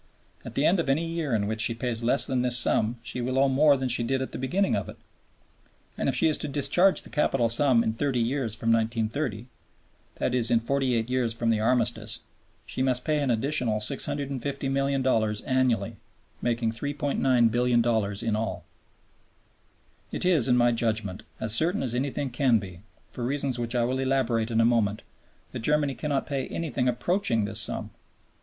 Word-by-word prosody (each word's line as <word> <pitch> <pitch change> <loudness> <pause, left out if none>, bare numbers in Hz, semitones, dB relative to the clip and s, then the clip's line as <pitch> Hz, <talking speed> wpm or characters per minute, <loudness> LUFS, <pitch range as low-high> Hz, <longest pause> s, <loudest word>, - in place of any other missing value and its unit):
At - - -9
the 140 - +1
end 180 +3 +3
of 165 - -1
any 150 +5 +1
year 165 -6 -2
in 105 -2 0
which 110 +1 0
she 115 0 +2
pays 115 -1 -3
less 125 +4 +2
than 130 -2 0
this 125 -1 +4
sum 120 -1 +1
she 125 +2 -4
will 130 +2 -2
owe 135 +1 +4
more 140 +2 +4
than 130 0 -2
she 120 -1 +3
did 130 +3 0
at 130 - -4
the - - -6
beginning 180 +10 0
of - - -3
it. - - -10 1.0
And - - -1
if - - 0
she 165 - +3
is 155 - 0
to - - -3
discharge 160 +7 +2
the - - -13
capital 135 -6 +1
sum 120 -1 +3
in 110 - -1
thirty 130 +1 -1
years 120 -2 -1
from 115 +1 0
1930, 115 +1 -1 0.7
i.e. 125 -1 0
in 115 - +4
forty 130 +1 0
eight 115 0 -1
years 125 -3 -1
from 115 0 0
the 110 - +1
Armistice, 115 -1 0 0.4
she - - -5
must 130 -1 0
pay 155 -1 +1
an 140 - 0
additional 120 -2 +1
$650,000,000 135 -2 -1
annually, 130 -3 0 0.4
making 115 -1 0
$3,900,000,000 120 -5 +1
in 115 -2 0
all. 110 +1 -3 1.5
It - - -3
is, 165 -9 +3
in 125 -1 +3
my 120 0 +4
judgment, 110 -4 -2 0.2
as 110 - +3
certain 165 - +1
as 125 -3 -2
anything 135 +1 -2
can 125 -1 +3
be, 95 -4 -7 0.3
for 120 - -6
reasons 135 -1 -1
which 120 +1 -2
I 120 - +2
will 130 +2 -1
elaborate 130 -4 0
in 115 -1 0
a - - +4
moment, 110 -3 +1 0.5
that - - -5
Germany 145 +3 +1
cannot 145 -1 -2
pay 135 -3 -3
anything 155 -6 -2
approaching 125 - +1
this 110 +1 -1
sum. - - -4
125 Hz, 185 wpm, -26 LUFS, 115-140 Hz, 1.5 s, this